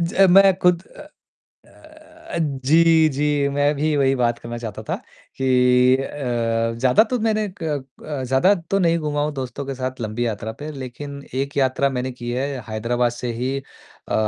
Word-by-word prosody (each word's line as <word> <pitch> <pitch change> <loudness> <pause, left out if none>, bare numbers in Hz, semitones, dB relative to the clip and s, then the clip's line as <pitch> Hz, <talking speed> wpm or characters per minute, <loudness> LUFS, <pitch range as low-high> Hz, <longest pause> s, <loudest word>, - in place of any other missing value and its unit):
ज 170 0 -2
अ, 195 0 +6
मैं 195 +1 +6
खुद 180 -1 +3
अ - - -15 0.7
अ - - -22 0.7
अ, - - 0
जी, 160 +3 +3
जी 145 0 0
मैं 145 +1 +2
भी 150 +1 0
वही 135 -1 +3
बात 120 -2 +1
करना 120 0 -6
चाहता 110 -2 -7
था - - -2 0.4
कि 125 -1 +4
अ, 115 -4 -1
ज़्यादा 125 - +4
तो 245 +1 -2
मैंने 215 -1 0
क - - -3 0.4
अ, 145 -4 -4
ज़्यादा 135 +10 +3 0.2
तो 195 - +3
नहीं 170 -2 +3
घूमा 150 -1 -2
हूँ 150 - -1
दोस्तों 135 0 -5
के 135 - -4
साथ 130 0 -4
लंबी 110 +2 -2
यात्रा 110 -1 -3
पे। 150 +1 -6
लेकिन 140 +1 -7
एक 140 +2 -3
यात्रा 135 0 +2
मैंने 130 0 -3
की 120 -1 -6
है 130 +3 -1 0.2
हैदराबाद 120 +2 0
से 120 0 -4
ही 125 +3 -2 0.5
अ, - - -2
135 Hz, 185 wpm, -21 LUFS, 125-150 Hz, 0.7 s, अ